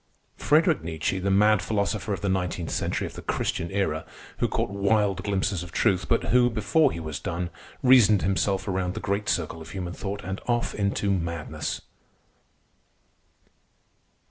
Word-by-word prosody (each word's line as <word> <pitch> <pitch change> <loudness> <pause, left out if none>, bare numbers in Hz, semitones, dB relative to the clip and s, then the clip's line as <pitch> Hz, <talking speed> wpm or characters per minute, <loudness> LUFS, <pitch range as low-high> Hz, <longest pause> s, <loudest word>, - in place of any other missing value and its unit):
Friederich 160 +2 +3
Nietzsche, 80 +3 -2
the 95 +1 -1
mad 105 +1 +4
philosopher 105 0 -1
of 95 -4 -2
the 100 - -1
nineteenth 90 -3 -1
century - - -1
of - - -7
the - - -8
Christian 85 - -2
Era, 95 -6 -1 0.4
who - - +2
caught - - -1
wild 100 -1 +1
glimpses 100 -2 0
of 90 -1 -8
truth, 90 +2 +1
but 115 - +2
who, 125 -1 +5
before 120 +7 +2
he - - -5
was 80 -3 -5
done, 85 +1 -3 0.3
reasoned 120 -6 +6
himself 95 0 0
around 95 -1 -1
the - - -3
great 100 +1 -1
circle 80 -1 -1
of 80 - -10
human 90 +1 -5
thought 100 +2 -5
and 95 +2 -5
off 120 -1 0
into 100 0 0
madness. 85 -4 -3
95 Hz, 160 wpm, -26 LUFS, 90-105 Hz, 0.4 s, reasoned